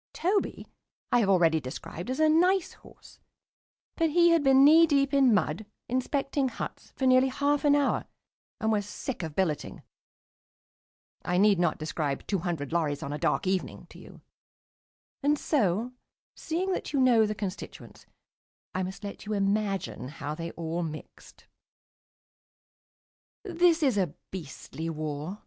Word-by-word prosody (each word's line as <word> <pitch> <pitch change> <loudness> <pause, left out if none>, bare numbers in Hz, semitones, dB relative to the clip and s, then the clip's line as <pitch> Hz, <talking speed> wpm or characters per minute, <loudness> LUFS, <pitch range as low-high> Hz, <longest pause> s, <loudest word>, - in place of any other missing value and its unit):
Toby 385 +4 -1 0.5
I 245 - +4
have 205 -4 +1
already 165 -4 +4
described 155 - -7
as 260 - -3
a 315 - +5
nice 355 +4 +3
horse, - - -18 0.8
but 330 -1 +1
he 345 +2 +4
had 335 -1 +4
been 270 0 +6
knee 325 +3 +7
deep 280 -2 +2
in 270 -3 +5
mud, 205 -1 0 0.2
inspecting 275 +2 -1
huts, - - -7
for 265 - -2
nearly 255 0 +5
half 285 +2 0
an 290 -1 +5
hour, 285 -1 +1 0.5
and 220 0 0
was 205 -2 0
sick 260 0 -5
of 160 -3 -6
billeting. 155 -7 -2 1.4
I 180 - 0
need 200 -1 +4
not 175 -2 +1
describe 155 -2 -3
two 195 - -1
hundred 165 -5 -4
lorries 150 -4 -1
on 140 - -4
a 150 - -4
dark - - 0
evening 185 0 -2
to - - -13
you. - - -14 1.0
And 295 +1 +2
so, 230 - 0 0.4
seeing 360 +4 -2
that 365 - -3
you 280 - +2
know 240 -4 +5
the 210 - -3
constituents, 195 -2 -8 0.7
I 185 - -1
must 190 +3 -6
let 200 +1 -8
you 215 - -2
imagine 195 - -1
how 145 +1 -6
they 165 +2 -5
all 165 +1 -3
mixed.... 155 -2 -9 2.0
This 345 -4 +2
is 255 -8 +2
a 180 -6 -1 0.2
beastly 165 -1 -7
war. 155 +3 -5
210 Hz, 150 wpm, -28 LUFS, 170-280 Hz, 2.0 s, knee